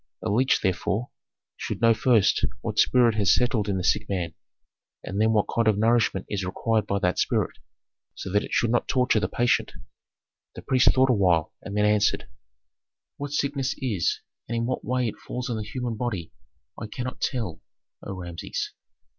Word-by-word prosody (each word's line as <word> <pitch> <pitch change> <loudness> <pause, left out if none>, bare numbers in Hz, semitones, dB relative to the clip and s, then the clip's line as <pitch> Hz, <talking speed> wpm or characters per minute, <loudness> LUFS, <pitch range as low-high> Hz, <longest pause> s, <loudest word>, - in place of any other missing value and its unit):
A - - -1
leech, 130 +6 +3
therefore, 95 +4 -1 0.4
should - - -5
know 115 0 +5
first 115 -3 +3 0.2
what - - -2
spirit 120 -2 +5
has 105 -2 +4
settled 120 -4 +1
in 95 - 0
the 90 - -2
sick 105 +3 +1
man, 90 -5 -2 0.7
and 100 +3 -2
then 110 +1 +4
what 105 -2 +3
kind 115 -1 +2
of 105 -2 +3
nourishment 110 -3 +2
is 100 -2 -3
required 110 +4 0
by 100 - 0
that 90 -2 0
spirit, - - 0 0.6
so 95 - -6
that 105 +2 +2
it - - -8
should 115 - +2
not 120 - +1
torture 125 -4 +2
the - - 0
patient." 120 0 +1 0.8
The - - -9
priest 130 -2 +4
thought 130 0 +3
awhile 90 -8 +2
and 100 +2 -5
then 105 - +3
answered, 105 0 +2 0.9
"What 145 0 -5
sickness 140 -2 -1
is 105 - -1 0.3
and 115 - -2
in 115 0 0
what 130 +1 -2
way 125 -1 0
it 110 - -5
falls 125 0 -5
on 115 - -1
the - - -3
human 120 +1 -4
body, 105 -9 -3 0.5
I 110 - -5
cannot 125 +4 -6
tell, 115 - -2 0.4
O 95 - -6
Rameses. 85 -2 -5
110 Hz, 180 wpm, -25 LUFS, 100-125 Hz, 0.9 s, know